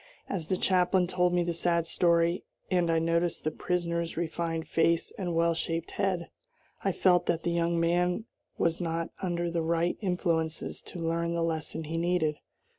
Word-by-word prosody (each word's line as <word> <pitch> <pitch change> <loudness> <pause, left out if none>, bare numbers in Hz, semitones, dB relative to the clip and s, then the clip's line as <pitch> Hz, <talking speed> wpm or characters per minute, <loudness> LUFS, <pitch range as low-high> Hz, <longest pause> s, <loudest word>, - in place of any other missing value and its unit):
As 170 -5 -3
the 185 - +1
chaplain 180 0 +3
told 180 0 +1
me 175 0 +2
the 170 0 -1
sad 170 0 +1
story, 170 +1 +2 0.3
and 175 -2 +2
I 165 - +3
noticed 165 +1 +1
the 155 - 0
prisoner's 170 -2 -2
refined 165 -1 -2
face 165 +1 +2
and 175 -4 -3
well 170 0 +3
shaped 165 0 -3
head, 185 -4 -1 0.6
I 195 - +2
felt 180 -1 +3
that 165 -1 0
the 170 - 0
young 170 0 +1
man 175 +5 +1 0.3
was 170 +1 +1
not 165 -1 -2
under 175 -2 -1
the 170 -1 0
right 170 +1 0
influences 170 -4 -1
to - - -8
learn 170 0 -1
the 170 - 0
lesson 160 0 -2
he 160 +2 -4
needed. 170 -3 +1
170 Hz, 175 wpm, -29 LUFS, 165-175 Hz, 0.6 s, chaplain